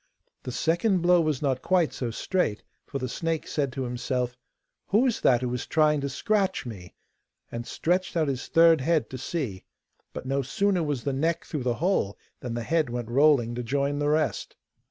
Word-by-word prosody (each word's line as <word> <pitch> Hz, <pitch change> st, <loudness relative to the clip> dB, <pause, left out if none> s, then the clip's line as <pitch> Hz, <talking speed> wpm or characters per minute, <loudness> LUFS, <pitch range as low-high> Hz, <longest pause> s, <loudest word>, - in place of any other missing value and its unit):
The 125 Hz, -, -6 dB
second 175 Hz, -, +1 dB
blow 175 Hz, 0 st, +5 dB
was 155 Hz, -3 st, -1 dB
not 130 Hz, -2 st, 0 dB
quite 180 Hz, -4 st, +2 dB
so 125 Hz, -, -3 dB
straight, 115 Hz, -, -1 dB, 0.2 s
for 140 Hz, -, -4 dB
the 130 Hz, -1 st, -3 dB
snake 165 Hz, +5 st, -2 dB
said 140 Hz, -3 st, -1 dB
to 135 Hz, -, -3 dB
himself, 125 Hz, 0 st, -2 dB, 0.5 s
'Who 220 Hz, +6 st, +3 dB
is 245 Hz, -4 st, 0 dB
that 125 Hz, -2 st, +4 dB
who 125 Hz, -1 st, -1 dB
is 125 Hz, -, -4 dB
trying 150 Hz, -2 st, +3 dB
to 140 Hz, -, -2 dB
scratch 195 Hz, +5 st, 0 dB
me?' 95 Hz, -7 st, -9 dB, 0.6 s
and 120 Hz, 0 st, -5 dB
stretched 175 Hz, +1 st, 0 dB
out 155 Hz, -2 st, +2 dB
his 135 Hz, -2 st, -3 dB
third 165 Hz, -2 st, +5 dB
head 160 Hz, +2 st, +1 dB
to 130 Hz, -, -6 dB
see; 125 Hz, -, -4 dB, 0.5 s
but -, -, -7 dB
no 135 Hz, +1 st, 0 dB
sooner 185 Hz, +8 st, +1 dB
was 145 Hz, -6 st, -2 dB
the 140 Hz, -, -1 dB
neck 160 Hz, +5 st, 0 dB
through 150 Hz, -, -4 dB
the 120 Hz, -1 st, 0 dB
hole 170 Hz, -, 0 dB, 0.2 s
than 120 Hz, -2 st, -5 dB
the 120 Hz, -, -3 dB
head 160 Hz, 0 st, +1 dB
went 120 Hz, -1 st, -4 dB
rolling 135 Hz, -3 st, +4 dB
to 120 Hz, -, -3 dB
join 140 Hz, +4 st, -1 dB
the 145 Hz, 0 st, +1 dB
rest. 155 Hz, 0 st, 0 dB
140 Hz, 195 wpm, -26 LUFS, 125-165 Hz, 0.6 s, blow